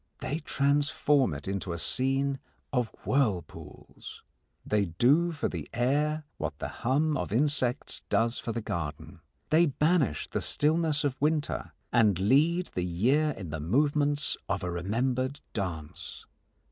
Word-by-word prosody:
They 150 +4 -2
transform 145 - +2
it 70 - -8
into 95 -2 -2
a - - -4
scene 135 +7 0 0.3
of 125 -3 +2 0.2
whirlpools. 110 - -3 0.4
They 105 -1 +2
do 140 - +3
for 155 - -2
the 80 -5 -6
air 150 +5 +1
what 80 -1 -4
the - - -4
hum 145 +5 +2
of - - -3
insects 130 +1 0
does 115 +4 +1
for 115 - -4
the 115 +1 -3
garden. 80 -8 -5 0.3
They 165 +2 +5
banish 150 - +1
the - - -2
stillness 155 0 +2
of 135 -2 -2
winter 150 0 0 0.2
and 110 -6 +4
lead 150 - +2
the 90 - -1
year 120 - +2
in 90 -5 -7
the 80 - -3
movements 145 - +1
of - - -1
a 90 - -2
remembered 125 +9 -1
dance. 85 -7 -5
130 Hz, 140 wpm, -29 LUFS, 100-150 Hz, 0.4 s, They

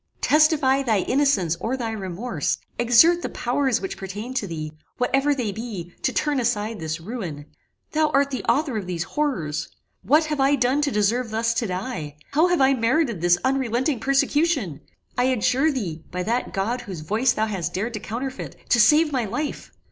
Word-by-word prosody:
"Testify 295 -3 +4
thy 220 -7 +1
innocence 255 - +2
or 255 +4 -2
thy 230 -3 -3
remorse: 195 -3 -2 0.2
exert 245 +9 +5
the - - -3
powers 260 0 0
which 190 - -5
pertain 205 +6 -6
to 220 -6 -2
thee, 155 -3 -5 0.3
whatever 275 +3 +2
they 240 -6 -2
be, 200 -6 -6
to - - +1
turn 295 -2 0
aside 225 -3 -1
this 160 0 -3
ruin. 170 -7 -6 0.5
Thou 310 0 +2
art 280 +1 +2
the 260 - -3
author 265 0 +1
of 195 -4 -4
these 175 -2 -2
horrors! 170 - -2 0.3
What 305 +4 +3
have 300 -2 -3
I 275 +1 +4
done 260 +2 +1
to 290 - +1
deserve 225 +3 +1
thus 225 +1 0
to 230 0 -1
die? 180 - -4 0.2
How 310 +5 +4
have 355 -4 +1
I 265 +1 +5
merited 235 - +1
this 175 0 +4
unrelenting 260 0 0
persecution? 275 - +1 0.4
I 245 - +3
adjure 260 +4 +2
thee, 175 - -4
by 180 0 -3
that 235 +5 -1
God 225 +6 -1
whose 190 -9 -7
voice 215 +11 +1
thou 215 - 0
hast 180 -5 -3
dared 220 +6 -2
to 215 - -3
counterfeit, 245 +5 -5
to 240 - +4
save 300 +8 +5
my 255 -4 0
life! 250 +8 -4
240 Hz, 185 wpm, -23 LUFS, 195-275 Hz, 0.5 s, exert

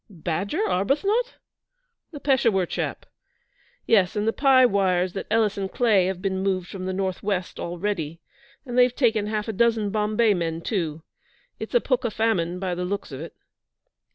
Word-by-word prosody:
'"Badger" 195 - -2
Arbuthnot?' 395 - 0 0.8
'The 295 - -8
Peshawur 230 -9 +2
chap. - - -4 0.8
Yes, 195 -5 +3
and 210 +1 -1
the 225 - +2
Pi 265 -2 +5
wires 185 -4 +1
that 195 - -5
Ellis 215 -2 +1
and 195 -1 -3
Clay 210 -7 +3
have 190 0 -4
been 190 -1 -1
moved 185 -2 -1
from 185 -1 -6
the - - -1
North 190 -1 -2
West 195 -3 -3
already, 170 -3 -3 0.5
and 245 -2 -5
they've 250 0 +4
taken 225 -6 +2
half 215 0 -2
a 220 - -2
dozen 225 -1 +2
Bombay 215 +1 +2
men, 165 -2 -2
too. 165 -6 -3 0.6
It's - - -6
pukka 255 - +1
famine, 185 -6 0
by 185 -1 -2
the 180 +1 -3
looks 195 -2 -4
of 135 +1 -7
it.' 165 - -9
200 Hz, 165 wpm, -24 LUFS, 180-230 Hz, 0.8 s, Pi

